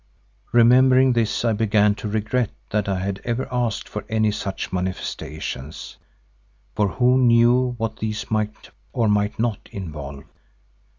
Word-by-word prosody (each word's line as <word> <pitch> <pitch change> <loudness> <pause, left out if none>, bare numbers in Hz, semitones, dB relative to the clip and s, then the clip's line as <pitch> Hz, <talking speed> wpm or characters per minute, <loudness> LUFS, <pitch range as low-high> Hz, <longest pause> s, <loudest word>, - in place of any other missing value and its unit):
Remembering 130 +2 +5
this 115 0 0
I 115 - +3
began 105 -1 +3
to 105 - -6
regret 110 +2 0 0.2
that 105 -1 0
I 95 - 0
had 100 0 -3
ever 120 +2 -2
asked 120 -3 -1
for 105 - -6
any 110 -1 +2
such 100 -2 -4
manifestations, 80 -5 -5 0.8
for 105 - +1
who 125 +5 +3
knew 125 +1 +4
what 115 -1 -3
these 110 0 -4
might 110 -1 -2 0.2
or 115 -2 +1
might 105 0 +1
not 115 -2 -2
involve? 75 -7 -7
110 Hz, 135 wpm, -22 LUFS, 100-120 Hz, 0.8 s, Remembering